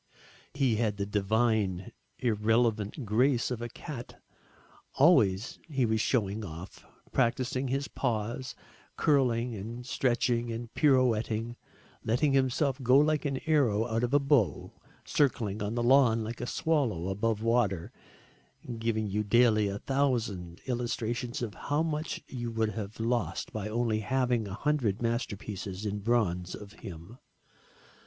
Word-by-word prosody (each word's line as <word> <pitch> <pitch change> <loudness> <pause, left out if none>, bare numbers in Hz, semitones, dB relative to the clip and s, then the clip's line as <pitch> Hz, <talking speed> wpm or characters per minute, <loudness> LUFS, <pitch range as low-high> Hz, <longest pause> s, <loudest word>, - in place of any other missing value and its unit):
He 130 -6 +2
had 105 -3 0
the 100 - -1
divine 105 -2 0 0.3
irrelevant 115 +1 +1
grace 125 +4 +2
of 120 -2 -3
a 120 - -4
cat. 125 0 -8 0.8
Always 115 - +4
he 135 -6 +1
was 110 -1 +1
showing 110 -4 0
off, 85 0 -9 0.3
practising 130 +1 0
his 135 +2 -1
paws, 120 +1 -3 0.4
curling 125 -4 +2
and 115 +4 -7
stretching 120 -2 0
and 115 0 -6
pirouetting, 120 -5 +2 0.5
letting 135 +6 +2
himself 135 +1 +1
go 130 +1 +5
like 150 +1 +3
an 135 -2 -1
arrow 130 -9 +3
out 115 -1 -1
of 120 - 0
a 145 - +5
bow, 140 -7 +1 0.3
circling 110 -7 0
on 105 +2 -2
the 120 - 0
lawn 120 -3 +5
like 115 +2 -6
a 120 - -3
swallow 120 - 0
above 105 +2 -1
water, 115 -7 +1 0.9
giving 115 -1 0
you 105 +2 -1
daily 110 -1 +4
a 100 0 -3
thousand 115 -11 -1
illustrations 120 -1 -2
of 110 -3 -4
how 145 +8 -1
much 155 0 -3
you 120 -2 -4
would 110 -1 0
have 105 +1 -6
lost 115 +1 -1
by 105 -1 -3
only 115 -1 0
having 125 0 0
100 115 0 0
masterpieces 105 -4 -3
in 105 0 -2
bronze 100 -5 0
of 105 0 -11
him. 95 +4 -10
115 Hz, 135 wpm, -29 LUFS, 105-130 Hz, 0.9 s, go